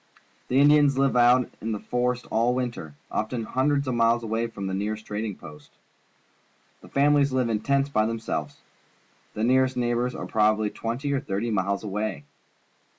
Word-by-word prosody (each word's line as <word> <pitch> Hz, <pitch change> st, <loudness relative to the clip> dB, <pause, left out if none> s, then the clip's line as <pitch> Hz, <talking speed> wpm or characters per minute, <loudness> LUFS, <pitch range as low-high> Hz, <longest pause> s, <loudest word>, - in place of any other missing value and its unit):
The 130 Hz, -, +2 dB
Indians 145 Hz, -1 st, +5 dB
hve 135 Hz, -1 st, +2 dB
out 125 Hz, 0 st, +4 dB
in 110 Hz, +1 st, -2 dB
the 105 Hz, -, -4 dB
forest 125 Hz, +2 st, -1 dB
all 120 Hz, +2 st, +2 dB
winter, 120 Hz, -, -4 dB, 0.2 s
often 115 Hz, +2 st, -2 dB
hundreds 140 Hz, +4 st, 0 dB
of 130 Hz, -, 0 dB
miles 115 Hz, 0 st, +2 dB
away 115 Hz, +1 st, -1 dB
from 105 Hz, -4 st, -7 dB
the 95 Hz, -, -3 dB
nearest 105 Hz, +3 st, -3 dB
trading 105 Hz, -1 st, -4 dB
post. 75 Hz, -1 st, -13 dB, 1.1 s
The -, -, -15 dB
families 140 Hz, 0 st, +3 dB
live 130 Hz, -2 st, 0 dB
in 110 Hz, -2 st, 0 dB
tents 140 Hz, +4 st, +1 dB
by 110 Hz, -5 st, +1 dB
themselves. 115 Hz, 0 st, -4 dB, 0.7 s
The 110 Hz, -, -2 dB
nearest 130 Hz, +1 st, +2 dB
neigh 120 Hz, -1 st, +1 dB
bours 125 Hz, +1 st, -1 dB
are -, -, -5 dB
probably 110 Hz, -1 st, +1 dB
twenty 125 Hz, +5 st, -3 dB
or 140 Hz, -, +1 dB
thirty 115 Hz, -2 st, -3 dB
miles 100 Hz, 0 st, -1 dB
away. 105 Hz, -6 st, -3 dB
120 Hz, 170 wpm, -25 LUFS, 110-130 Hz, 1.1 s, Indians